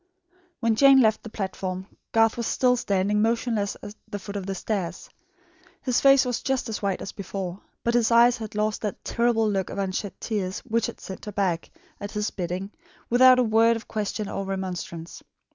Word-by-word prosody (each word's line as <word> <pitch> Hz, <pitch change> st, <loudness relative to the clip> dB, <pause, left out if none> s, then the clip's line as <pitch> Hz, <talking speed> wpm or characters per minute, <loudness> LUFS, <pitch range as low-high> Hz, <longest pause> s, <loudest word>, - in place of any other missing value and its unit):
When 230 Hz, -1 st, +2 dB
Jane 275 Hz, +2 st, +7 dB
left 220 Hz, -3 st, +3 dB
the 225 Hz, -, -9 dB
platform, 190 Hz, -2 st, -4 dB, 0.3 s
Garth 225 Hz, 0 st, +4 dB
was 235 Hz, -1 st, -2 dB
still 250 Hz, -1 st, +3 dB
standing 205 Hz, -2 st, +1 dB
motionless 225 Hz, -2 st, 0 dB
at 205 Hz, -, -7 dB
the 205 Hz, -, -5 dB
foot 200 Hz, +1 st, -8 dB
of 195 Hz, -2 st, -4 dB
the 195 Hz, -, -2 dB
stairs. 190 Hz, -3 st, -4 dB, 0.7 s
His 255 Hz, -2 st, +1 dB
face 275 Hz, -1 st, +6 dB
was 245 Hz, -1 st, -2 dB
just 265 Hz, -2 st, -1 dB
as 220 Hz, -, -4 dB
white 195 Hz, -2 st, -1 dB
as -, -, -6 dB
before, 190 Hz, -1 st, -5 dB, 0.2 s
but 235 Hz, -, +1 dB
his 235 Hz, -2 st, +3 dB
eyes 235 Hz, +1 st, +6 dB
had 220 Hz, -2 st, -7 dB
lost 210 Hz, 0 st, 0 dB
that 210 Hz, -2 st, -5 dB
terrible 235 Hz, -2 st, +2 dB
look 195 Hz, -3 st, -1 dB
of -, -, -6 dB
unshed 195 Hz, 0 st, -3 dB
tears, 200 Hz, -3 st, -2 dB
which 230 Hz, -2 st, 0 dB
had -, -, -8 dB
sent 190 Hz, -, -8 dB
her 210 Hz, -, -5 dB
back, 185 Hz, -5 st, -1 dB, 0.3 s
at 205 Hz, 0 st, -6 dB
his 210 Hz, -1 st, -1 dB
bidding, 185 Hz, +2 st, -4 dB, 0.4 s
without 255 Hz, +1 st, +7 dB
a 250 Hz, -, +4 dB
word 225 Hz, +1 st, +4 dB
of 225 Hz, -, -7 dB
question 210 Hz, -1 st, -3 dB
or 195 Hz, -, -3 dB
remonstrance. 185 Hz, -3 st, -5 dB
210 Hz, 195 wpm, -25 LUFS, 195-230 Hz, 0.7 s, Jane